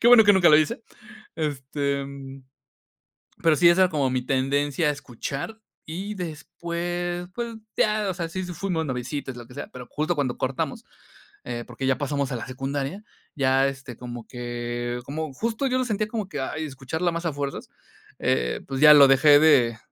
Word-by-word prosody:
Qué 235 - +5
bueno 240 -3 +9
que 205 - +7
nunca 185 -3 +5
lo 150 - +8
hice. 155 -1 0 0.5
Este, 140 -1 -2
mm, 135 -1 -10 1.0
pero, 165 -2 +4
sí, 170 +3 +5
esa 175 +2 +6
era 185 - +3
como 140 -4 +1
mi 130 0 0
tendencia 140 +4 +1
a - - +3
escuchar, 140 - -6 0.3
y 190 +6 -5
después, 175 +1 -4
pues, 235 -2 -4 0.2
ya, 210 -1 +2
o - - -1
sea, 170 -2 -4
si 185 +2 -4
fuimos 175 -2 -2
noviecitos, 130 0 -4
lo 120 -1 -10
que 125 - -14
sea. 145 - -6
Pero, 125 -1 -9
justo 155 +3 -1
cuando 135 -5 -1
cortamos, 130 0 -2 0.6
eh, 120 -1 -4
porque, 130 +2 -4
ya 130 - +2
pasamos 140 -1 -1
a - - -1
la 115 - -5
secundaria, 135 +8 -4 0.3
ya, 135 -1 +3
este, 135 -3 -7
como 120 -2 -8
que 120 0 -4
como 155 +1 -4
justo 225 - -2
yo 255 0 +1
lo 255 - 0
sentía, 215 -2 -1
como 215 -4 -4
que, 145 - -5
ay, 155 +4 -3
escucharla 150 +5 -2
más 170 +1 -4
a 165 - 0
fuerzas, 140 -1 -4 0.5
eh, - - 0
pues, 135 0 -3
ya 150 0 +10
lo 140 -2 +9
dejé 145 +2 +7
de 130 -7 +5
145 Hz, 185 wpm, -25 LUFS, 130-175 Hz, 1.0 s, ya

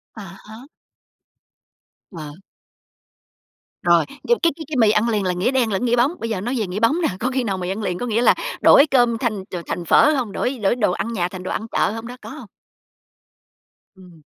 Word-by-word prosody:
À 215 - -8 0.2
há. 225 +6 -12 1.4
Ờ. 155 -5 -8 1.5
Rồi, 170 -2 +4 0.2
nhưng 475 - +3
mà - - -12
cái 335 - +4
cái 315 -1 -8
cái 305 - -5
mì 220 -3 +5
ăn 215 +2 +1
liền 210 -3 0
là 180 - 0
nghĩa 180 +8 0
đen 245 -5 +1
lẫn 195 +5 -1
nghĩa 240 0 +2
bóng. 245 +5 +2
Bây 230 - -4
giờ 205 -5 -2
nói 240 +6 -3
về 210 - -2
nghĩa 180 +3 -4
bóng 275 +10 +2
nè, 325 - +2
có 250 - -1
khi 260 -1 -1
nào 195 -4 -2
mì 180 -1 -4
ăn 195 +3 -3
liền 180 -3 -2
có - - -3
nghĩa 230 0 0
là - - +5 0.3
đổi 280 - +7
cơm 240 -3 +3
thành 220 -5 -2
ch 190 - -9
thành 175 - -4
phở 300 - +5
hông? 240 -6 -2
Đổi 255 +6 -2
đổi 205 +3 +1
đồ 215 -6 +1
ăn 225 +5 -3
nhà 175 -5 -1
thành 180 0 -9
đồ - - -4
ăn 220 - -4
chợ - - +1
hông 225 +1 -7
đó, 250 +1 -9
có - - -10
hông? - - -10 1.5
Ừm. 180 -4 -17
220 Hz, 230 wpm, -21 LUFS, 190-245 Hz, 1.5 s, đổi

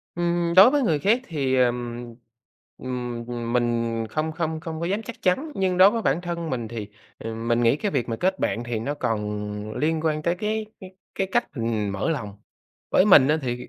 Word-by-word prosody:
Ừm, 170 0 0
đối 200 +6 +10
với 290 0 +2
người 160 - +2
khác 215 - +2
thì, 140 -6 -1
ờ, 125 - +5
ừm, 120 -1 -5 1.1
ừm, 120 -1 -4
mình 115 -2 0
không 155 +4 -2
không 160 -1 -3
không 160 0 -6
có 170 - -1
dám 200 +4 -1
chắc 235 - -9
chắn, 265 - +1
nhưng 185 -3 0
đối 190 +2 +8
với 230 +1 -2
bản 155 -1 +1
thân 170 -2 -4
mình 120 -4 -3
thì 110 -3 -6 0.4
mình 115 +1 -1
nghĩ 115 +4 +4
cái 205 +6 -2
việc 130 -7 -1
mà 115 - -2
kết 190 +7 0
bạn 120 - -1
thì 120 -1 -3
nó 140 +7 -3
còn 105 -3 -3
liên 160 +1 0
quan 155 -1 0
tới 170 +2 +1
cái 215 +3 -2 0.5
cái 195 - -1
cách 240 - +3
mình 110 -3 -1
mở 100 +11 -1
lòng. 105 -10 -4 0.5
Với - - +5
mình 140 -9 +7
á 155 +1 +3
thì, 125 -1 -4
145 Hz, 205 wpm, -24 LUFS, 115-175 Hz, 1.1 s, đối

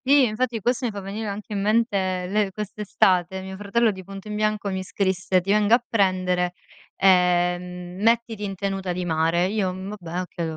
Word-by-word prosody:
I 280 +1 +6
infatti 235 +1 -1
questo 245 +3 0
mi - - -3
fa 205 - -6
venire 200 +3 -5
anche 205 +1 -6
in 200 - -1
mente 200 -4 +1
le 205 +1 +1
quest'estate. 190 -3 0
Mio 190 0 -7
fratello 205 +3 +1
di 190 -1 -9
punto 195 +2 -10
in 210 - -4
bianco 215 -1 0
mi 190 0 -2
scrisse: 190 -1 0
"Ti 195 +3 -1
vengo 210 +2 +5
a 240 - -2
prendere, 185 -4 +1 0.4
ehm, 180 0 +2
mettiti 230 -1 +1
in 195 -1 -3
tenuta 195 -1 -2
di 180 0 -3
mare." 165 +1 +2
Io, 195 -1 0
mhmm, 190 +2 -6
vabbè, 175 0 -4
okay, 170 -3 -4
195 Hz, 185 wpm, -24 LUFS, 180-210 Hz, 0.4 s, I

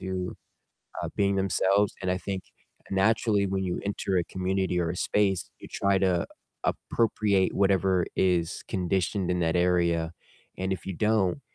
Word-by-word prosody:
to, 95 -1 -4 0.7
uh, - - -2
being 100 -1 +2
themselves, 95 +1 +2
and 90 - 0
I 90 - 0
think 95 -1 -4 0.5
naturally 105 +1 +2
when 95 0 -1
you 90 - -2
enter 100 -1 -1
a 85 - 0
community 95 0 -1
or 85 -1 0
a 90 - -4
space, 95 -1 +1
you - - -11
try 100 0 +1
to 90 -3 +1 0.4
appropriate 105 -4 +1
whatever 95 -2 +2
is 90 -2 +1
conditioned 95 0 0
in 90 0 0
that 85 0 +1
area, 85 -2 +2 0.5
and 95 +1 -1
if 90 -3 -5
you 95 - -3
don't, 105 - +1
95 Hz, 155 wpm, -27 LUFS, 90-100 Hz, 0.7 s, being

